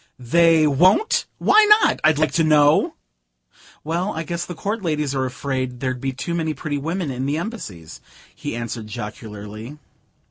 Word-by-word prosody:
"They 160 +5 +4
won't? 180 - +3
Why 435 - +5 0.2
not, - - +2
I'd 155 -1 +4
like 155 +1 +1
to 165 - +2
know?" 150 -1 +4 0.9
"Well, 170 +6 -1
I 160 - -4
guess 170 +1 -4
the 175 - -6
court 205 +6 -3
ladies 150 -5 -1
are 130 -1 0
afraid 130 -1 -3
there'd 130 -1 -3
be 135 - -1
too 140 +6 -5
many 160 -2 -1
pretty 145 -2 -3
women 165 +1 -3
in 130 +1 -3
the 145 +2 0
Embassies," 160 - -7 0.3
he - - -6
answered 115 -2 -5
jocularly. 105 +4 -8
150 Hz, 165 wpm, -21 LUFS, 125-170 Hz, 0.9 s, Why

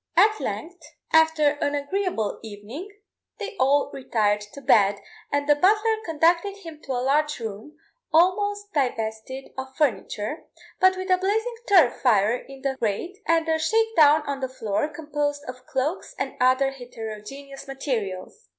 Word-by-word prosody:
At 425 +4 +5
length, 355 +2 -5 0.3
after 320 -2 +5
an 285 - +1
agreeable 290 - -2
evening, 225 - -8 0.5
they 415 -2 -6
all 280 +2 +3
retired 210 -5 0
to - - -8
bed, 205 -6 +4 0.3
and 285 0 0
the 295 - +7
butler 425 +8 +3
conducted 335 +4 +2
him 330 -6 -11
to 270 - -3
a 250 0 -1
large 300 +1 +1
room, 225 +7 -7 0.3
almost 405 +5 +2
divested 245 -1 -2
of 265 0 -7
furniture, 235 - -1 0.3
but 375 0 +5
with 375 0 -3
a 365 - +4
blazing 445 +5 0
turf 355 - +5
fire 220 -2 +4
in 270 +1 -10
the 270 -1 -1
grate, 250 - -2
and 330 0 +2
a 320 0 +1
shake 445 +7 +1
down 305 -1 +6
on 280 -2 -3
the 260 -1 -3
floor, 225 +1 -1
composed 295 -2 -3
of 255 +1 -9
cloaks 305 +4 -2
and - - -3
other 260 +2 +4
heterogeneous 250 +2 -9
materials. 260 - -4
285 Hz, 150 wpm, -25 LUFS, 250-345 Hz, 0.5 s, the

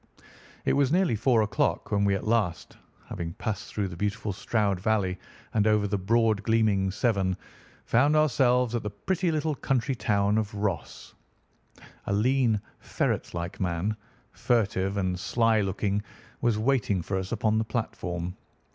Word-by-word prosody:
It - - +3
was 140 -1 +2
nearly 175 -8 +3
four 115 +1 +3
o'clock 100 0 -1
when 100 -1 +2
we 100 -1 +3
at 95 - -4
last, 105 -7 0 0.4
after - - -4
passing 105 -2 -4
through 100 -2 -1
the 90 - -8
beautiful 105 +2 -2
Stroud 100 -1 0
Valley, 95 -2 0 0.3
and 105 -1 +2
over 105 -1 +3
the 100 - -1
broad 110 +1 +2
gleaming 105 -3 +2
Severn, 95 -2 0 0.5
found 140 +6 +3
ourselves 125 -5 +3
at 120 - 0
the 105 - -3
pretty 175 - -1
little 155 0 0
country 135 -1 0
town 105 -3 +1
of 105 -1 -3
Ross. 100 -3 -4 0.9
A 100 - 0
lean, 120 +1 +2 0.2
ferret - - -2
like 85 +2 -5
man, 90 +3 -1 0.4
furtive 100 -4 0
and 90 -2 -1
sly 115 +2 +2
looking, 100 +1 -1 0.4
was 120 -3 +2
waiting 110 -6 +1
for 95 - -3
us 95 0 -6
upon 110 -1 +1
the - - +1
platform. 90 -6 -4
105 Hz, 155 wpm, -27 LUFS, 100-120 Hz, 0.9 s, It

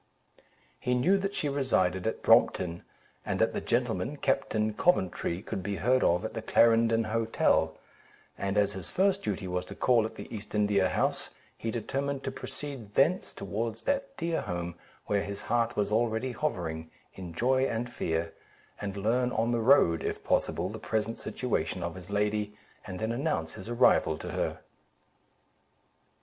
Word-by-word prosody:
He 125 - 0
knew 180 +11 +3
that 195 +1 -2
she 150 - -1
resided 110 -10 +1
at 110 - -3
Brompton, 85 -1 +4 0.4
and - - -2
that - - +2
the - - -2
gentleman, 120 +3 -1
Captain 110 -6 0
Coventry, 95 - +1
could 95 - -4
be 100 +2 -3
heard 125 +7 +2
of 90 +5 +2
at - - -4
the 115 - -4
Clarendon 115 0 +4
Hotel; 115 +1 +1 0.6
and 100 +1 -2
as 100 -1 +3
his 95 -3 -7
first 195 +1 +2
duty 100 - -3
was 90 0 -1
to - - -9
call 120 -3 +3
at - - -14
the - - -8
East 105 0 -7
India 100 -3 +3
House, - - 0 0.3
he 115 - -4
determined 135 +5 -2
to 135 - -2
proceed 130 -6 -7
thence 165 +7 +3
towards 110 +4 -4
that 275 -1 -1
dear 170 -6 -1
home, 85 -3 -4 0.3
where 100 -1 +1
his 100 0 -5
heart 120 0 +1
was 105 0 0
already 115 +3 +1
hovering, 85 - -3 0.2
in 90 -3 -8
joy 130 +8 +2
and 115 0 -2
fear, 80 -4 -2 0.5
and 100 -1 -4
learn 120 +5 +1
on 115 +1 +1
the 120 - +1
road, 110 - +5
if - - -3
possible, 85 +2 +1
the 110 +3 -6
present 110 +1 -2
situation 90 -8 -2
of 85 0 -3
his 90 0 -11
lady, 105 0 0 0.3
and 95 -2 -5
then 110 +3 -1
announce 120 - -1
his 95 - -9
arrival 80 -9 +4
to - - -6
her. - - -2
110 Hz, 165 wpm, -29 LUFS, 95-125 Hz, 0.6 s, road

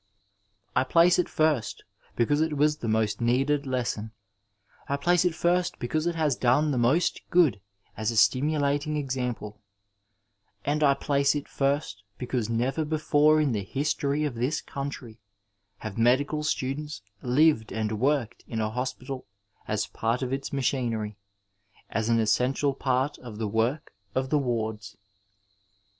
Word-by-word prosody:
I 130 - +4
place 170 +6 +4
it 180 - +1
first 155 -8 0 0.3
because 145 +6 +2
it 160 -2 0
was 150 +1 +3
the 115 - -5
most 110 0 0
needed 135 +4 +1
lesson, 120 -4 -2 0.8
I 140 - +1
place 175 +5 +2
it 175 -3 +1
first 175 +1 +1
because 155 +7 -1
it 170 - -1
has 155 -5 +1
done 140 +5 +2
the 130 - 0
most 135 +9 +2
good 165 - +3 0.3
as 110 +1 -1
a 115 - -2
slamulat 145 +4 +2
ing 150 0 -1
example, 125 -6 -3 1.0
and 150 +2 0
I 140 -1 +5
place 140 0 +1
it 145 - -3
first 135 -7 -1 0.2
because 125 -3 -2
never 125 +7 0
before 155 0 +3
in 150 -3 +2
the 105 -3 -1
history 140 +5 -1
of 145 -4 -1
this 125 +6 -1
country 135 -5 -7 0.6
have 110 0 -6
medical 140 +6 +2
students 150 -3 -3 0.2
lived 130 -2 +3
and 110 -1 -2
worked 135 -3 0
in 115 - -3
a 110 0 -1
hospital 130 +1 -4 0.4
as 105 0 0
part 115 +4 -2
of 130 +1 -2
its 135 0 -3
machinery, 120 -6 -1 0.8
as 110 +2 -1
an 115 0 +3
essential 125 +6 +1
part 130 +2 -1
of 115 -4 -9
the 110 -1 -2
work 115 +8 -1 0.2
of 130 0 -1
the 150 - +4
wards. 110 -5 -3
130 Hz, 150 wpm, -27 LUFS, 115-150 Hz, 1.0 s, I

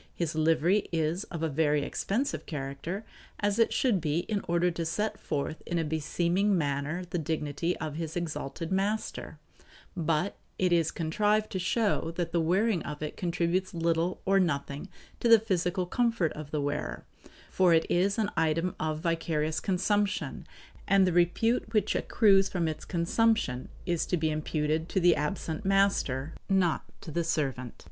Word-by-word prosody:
His 170 -3 -2
livery 165 +5 +2
is 165 +3 0
of 165 -2 -6
a - - +2
very 150 -1 +1
expensive 235 - -2
character, 150 +7 -5 0.3
as 205 +1 0
it 230 - +4
should 225 -9 +2
be 155 +1 0
in 205 +2 -2
order 175 +1 +2
to 165 0 -3
set 210 +7 -2
forth 150 +1 -3
in 175 - -1
a 165 - +1
beseeming 170 +6 +1
manner 145 +3 -1
the 175 - 0
dignity 160 +1 -2
of 155 -2 -5
his 165 0 -4
exalted 165 -1 -4
master; 200 +3 -2 0.6
but 165 +2 0 0.2
it 180 -2 +2
is 165 -2 +3
contrived 210 +6 0
to 190 - -2
show 200 0 +1
that 170 -1 -2
the 170 0 +2
wearing 190 +3 +2
of 150 0 -6
it 150 - -4
contributes 175 +1 -1
little 165 +1 0
or 195 0 +4
nothing 145 0 -1 0.3
to 235 - +1
the 230 - +10
physical 185 -3 -1
comfort 230 -4 +1
of 150 -1 -8
the 150 -1 -1
wearer, 140 - -3 0.5
for 185 -2 +4
it 160 -1 +4
is 195 +4 +2
an 215 -2 0
item 165 +2 +1
of 155 0 -2
vicarious 160 -2 0
consumption, 205 +2 0 0.4
and 195 -1 +5
the 180 - +1
repute 215 +7 +2
which 210 -2 +2
accrues 195 -3 +4
from 175 -3 -1
its 155 - -4
consumption 175 - +1 0.2
is 170 -2 0
to 180 - +1
be 160 -1 0
imputed 155 +1 -1
to - - +1
the 175 -1 +5
absent 155 +3 -3
master, 195 -8 +1 0.2
not 185 -4 +2 0.2
to 160 - -8
the 170 +3 0
servant. 135 -7 -2
170 Hz, 165 wpm, -29 LUFS, 155-195 Hz, 0.6 s, the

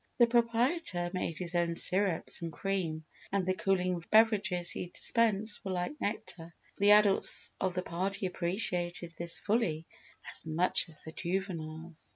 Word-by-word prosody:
The 240 - +6
proprietor 235 - +1
made 170 -3 -3
his 180 -1 -2
own 170 -1 0
syrups 185 -2 +2
and 165 -1 -4
cream 165 -3 -3 0.3
and 195 -2 0
the 185 - +1
cooling 185 -2 -1
beverages 205 -5 +3
he - - -4
dispensed 215 +2 0
were 195 - -5
like 180 +12 -4
nectar. 170 -5 -5 0.2
The 200 +1 +4
adults 210 -2 +4
of 185 -1 -1
the 180 - -2
party 190 +3 -2
appreciated 175 -2 -2
this 170 0 0
fully 195 -8 -1 0.5
as - - -2
much 170 +2 +1
as 155 - -4
the 160 - -8
juveniles. 165 -3 -5
185 Hz, 150 wpm, -31 LUFS, 170-205 Hz, 0.5 s, The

